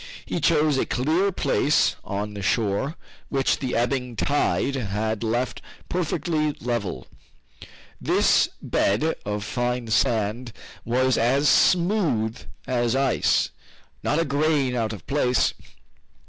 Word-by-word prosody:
He - - -3
chose 150 -3 +3
a - - +1
clear 160 +10 +1
place 150 -4 +2
on 105 +1 -4
the 100 - -6
shore, 110 - 0 0.3
which 135 -1 +1
the 130 -2 -2
ebbing 125 0 -1
tide 140 +2 0
had 110 -3 -2
left 120 +2 -1 0.3
perfectly 160 -3 -1
level. 115 -7 -3 1.0
This - - +3
bed 115 +12 +1
of 105 0 -2
fine 120 +1 -2
sand 110 +2 0 0.3
was 130 +2 +2
as 135 +6 +2
smooth 170 - +2 0.3
as 120 -1 0
ice, 135 -3 +2 0.5
not 150 - 0
a 165 - +2
grain 145 -2 +1
out 115 -2 -1
of 100 -6 -9
place. 125 -3 +1
125 Hz, 120 wpm, -24 LUFS, 110-145 Hz, 1.0 s, chose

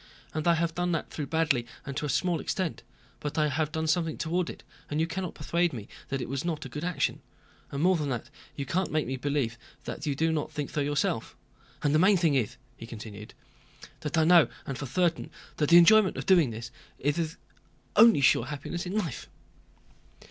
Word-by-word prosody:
"And 155 +1 -2
I 170 - +5
have 165 0 0
done 175 0 0
that 165 - -3
though 150 -3 -4
badly 150 -6 +1 0.2
and 140 - -5
to 150 +1 -2
a - - -5
small 175 +4 +1
extent; 185 -1 -2 0.4
but 150 +1 -4
I 155 -1 +3
have 155 +2 -1
done 160 0 -2
something 160 0 0
toward 170 +2 -1
it - - -9 0.3
and 150 - -1
you 160 - +3
cannot 180 +1 -4
persuade 170 +2 0
me 110 -5 -7 0.2
that 135 - -1
it - - -4
was 135 +1 -3
not 160 -4 -3
a - - -7
good 150 +5 -6
action, 180 -1 -1 0.5
and 140 +2 -2
more 185 +1 +5
than 150 -4 -2
that, 120 +1 -4 0.2
you 140 - -4
can't 180 +7 -1
make 155 -1 +1
me 130 - -3
believe 130 -4 -1 0.2
that 155 - -6
you 145 - 0
do 160 +3 +1
not 155 -2 -2
think 145 -2 -4
so 150 - -1
yourself. 145 0 -1 0.5
And 145 -1 +2
the 155 - +4
main 190 +3 +5
thing 165 -4 +2
is," 125 -6 0 0.2
he 115 - -9
continued, 105 -2 -9 0.6
"that 150 +1 -3
I 160 - +5
know, 170 -1 +7 0.2
and - - -9
know - - -8
for 140 - -4
certain, 170 +5 0 0.3
that 150 - +1
the 170 - +9
enjoyment 205 +3 +6
of - - -4
doing 175 -8 +5
this 115 +1 -7 0.3
good - - -15
is 165 -1 -1
the - - -22 0.6
only 225 -10 +7
sure 135 - +4
happiness 155 +5 -5
in 195 +4 -2
life." 170 - -3
155 Hz, 220 wpm, -28 LUFS, 140-170 Hz, 0.6 s, the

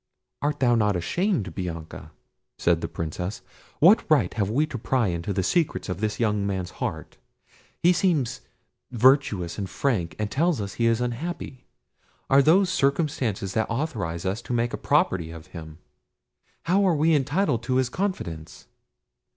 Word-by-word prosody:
"Art 145 +1 -1
thou 120 -2 +3
not 105 -4 +2
ashamed, 110 - -1
Bianca!" 85 -4 -6 0.5
said - - +2
the - - -2
Princess. 90 +5 -5 0.3
"What 190 +8 +6
right 155 -2 +3
have 100 -3 -1
we 140 +8 +2
to 125 - -6
pry 120 -2 +1
into 85 +3 -3
the 95 -1 0
secrets 165 - 0
of 90 -1 -3
this 110 -1 -2
young 105 -3 +1
man's 95 -2 -3
heart? - - -4 0.7
He 175 +1 +6
seems 140 -9 0 0.5
virtuous 120 - +2
and 95 -2 -4
frank, 95 - -1
and 105 -1 -3
tells 165 0 +1
us 100 -1 -4
he 115 - +1
is 115 +1 +2
unhappy. 130 +2 -4 0.7
Are 135 +1 +7
those 180 +6 +4
circumstances 135 - 0
that 110 -1 0
authorise 110 - -3
us 100 +5 -1
to 125 - -5
make 120 0 0
a - - -2
property 85 -3 +1
of 80 -1 -10
him? 80 -3 -9 0.9
How 190 +4 +2
are 175 - +3
we 160 +2 +3
entitled 145 - +1
to 125 - 0
his 130 -1 +2
confidence?" 85 - -4
115 Hz, 160 wpm, -25 LUFS, 95-145 Hz, 0.9 s, Are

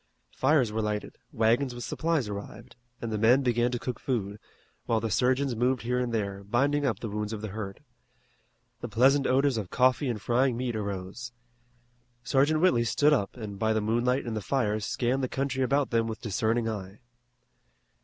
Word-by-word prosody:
Fires 135 -5 +3
were 110 +1 -1
lighted, 105 -1 -3
wagons 120 +4 +1
with 120 - -6
supplies 160 -7 -1
arrived, 100 +3 -8 0.3
and 115 - -3
the 105 - -1
men 120 +5 +5
began 120 -1 +2
to 125 - -1
cook 125 0 -5
food, 105 -5 -2 0.5
while 115 - +2
the 110 0 -3
surgeons 130 +3 +1
moved 125 +2 +1
here 125 +2 0
and 125 -1 -1
there, 100 -3 -2
binding 140 +7 +1
up 115 -6 0
the 115 - -5
wounds 105 +1 -3
of 105 - -5
the 110 - -5
hurt. 100 -1 -6 1.0
The - - -6
pleasant 135 +4 +4
odors 135 -1 +2
of 100 -5 -4
coffee 130 +2 +2
and 115 -3 -2
frying 120 +3 +1
meat 125 -2 -2
arose. 100 +3 -5 0.9
Sergeant 140 +4 +2
Whitley 125 -11 +4
stood 145 +5 +3
up 105 -4 -1
and 105 -4 -7
by 110 0 +2
the 110 - +1
moonlight 120 +5 +1
and 115 -2 -3
the 110 - -2
fires 110 -3 -1
scanned 125 +2 0
the 130 - -1
country 135 -1 -2
about 135 +2 +1
them 115 -1 +2
with 110 -1 -5
discerning 115 +2 0
eye. 100 -1 -6
120 Hz, 185 wpm, -28 LUFS, 110-130 Hz, 1.0 s, men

